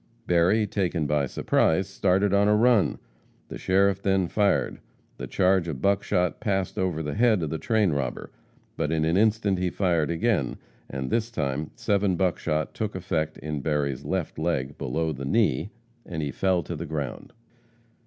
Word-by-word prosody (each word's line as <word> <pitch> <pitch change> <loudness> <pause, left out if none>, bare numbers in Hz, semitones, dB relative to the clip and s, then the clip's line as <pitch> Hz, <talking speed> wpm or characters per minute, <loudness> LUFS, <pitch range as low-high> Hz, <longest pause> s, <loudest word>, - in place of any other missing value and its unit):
Berry, 90 +6 +3
taken 90 -6 -1
by 75 -1 +1
surprise, 80 +7 +1
started 95 0 +1
on 100 +1 +4
a 105 - +4
run. 115 -2 +3 0.5
The - - -7
sheriff 100 +1 +2
then 95 -2 +1
fired. 100 -2 +1 0.4
The - - -6
charge 95 -2 +2
of 75 -6 -4
buckshot 90 -2 +1
passed 95 -3 -1
over 90 -4 -1
the 75 -1 -3
head 110 -4 +3
of 75 - -3
the 80 - -3
train 110 -6 +2
robber, 70 -4 -3 0.4
but 75 - -1
in 80 -1 +1
an 80 +2 +1
instant 105 -2 +2
he 90 0 0
fired 85 -5 +1
again, 85 - 0 0.3
and 65 -1 -4
this 115 0 0
time 75 - -2
seven 100 -5 +1
buckshot 85 -4 -1
took 110 -3 -3
effect 85 -4 -2
in 75 0 -4
Berry's 70 -3 -1
left - - -3
leg, 65 +2 -1
below 80 +5 -2
the 70 -1 -7
knee, 95 - +1 0.3
and 80 -3 -5
he 70 - -2
fell 95 +3 +1
to 85 - -5
the 80 +2 -6
ground. 75 -3 -5
90 Hz, 170 wpm, -26 LUFS, 75-100 Hz, 0.5 s, on